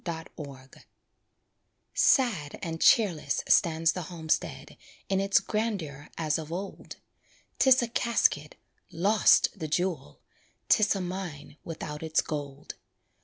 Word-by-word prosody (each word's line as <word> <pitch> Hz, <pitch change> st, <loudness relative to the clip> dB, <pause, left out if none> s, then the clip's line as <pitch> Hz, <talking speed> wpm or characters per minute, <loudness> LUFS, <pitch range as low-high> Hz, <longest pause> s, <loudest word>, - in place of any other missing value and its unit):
WRITTEN 165 Hz, -2 st, -5 dB
FOR 135 Hz, -3 st, -10 dB, 1.2 s
Sad 225 Hz, -, +2 dB
and 165 Hz, -1 st, -4 dB
cheerless 190 Hz, -9 st, +3 dB
stands 165 Hz, -1 st, +3 dB
the 180 Hz, -, -5 dB
homestead 160 Hz, -3 st, -3 dB, 0.3 s
In 195 Hz, -1 st, +1 dB
its 195 Hz, +1 st, +3 dB
grandeur 185 Hz, -11 st, -3 dB
as 155 Hz, -1 st, 0 dB
of 160 Hz, 0 st, -8 dB
old; 190 Hz, +3 st, -6 dB, 0.6 s
'Tis 260 Hz, -2 st, +5 dB
a -, -, -1 dB
casket 225 Hz, -11 st, +1 dB, 0.4 s
lost, 200 Hz, +5 st, +4 dB
the 155 Hz, -, -3 dB
jewel; 165 Hz, -, -2 dB, 0.5 s
'Tis 215 Hz, -1 st, +4 dB
a 195 Hz, -, -2 dB
mine 175 Hz, -5 st, -6 dB
without 155 Hz, -2 st, -6 dB
its 160 Hz, -1 st, +1 dB
gold. 145 Hz, -2 st, -6 dB
165 Hz, 120 wpm, -28 LUFS, 150-195 Hz, 1.2 s, Tis